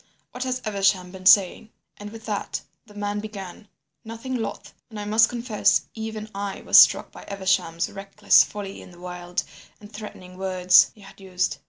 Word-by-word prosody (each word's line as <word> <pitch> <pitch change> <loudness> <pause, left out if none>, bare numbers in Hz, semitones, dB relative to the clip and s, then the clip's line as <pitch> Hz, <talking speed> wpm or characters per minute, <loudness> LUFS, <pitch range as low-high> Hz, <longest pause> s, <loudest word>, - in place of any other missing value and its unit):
What 250 +1 -5
has 255 0 -3
Evesham 195 -3 +1
been 185 0 -4
saying?' 195 +3 +5 0.3
"And 205 0 -8
with 220 +1 -12
that 210 -2 -3 0.3
the 210 - -17
man 205 0 -3
began, 205 -1 -9 0.4
nothing 230 +3 -7
loth, 225 -3 -5 0.2
and 220 -2 -8
I 205 - -5
must 220 +2 +4
confess 235 -3 +1
even 220 -1 -6
I 200 0 -5
was - - +7
struck - - +5
by - - -12
Evesham's 185 -4 0
reckless 200 +1 +3
folly 200 -2 -8
in - - -13
the 175 -1 -16
wild 180 0 -5 0.4
and 210 +1 -15
threatening 185 -3 -10
words 185 -1 +4
he 210 - -18
had 195 0 -15
used. 185 -1 -2
205 Hz, 175 wpm, -24 LUFS, 185-215 Hz, 0.4 s, was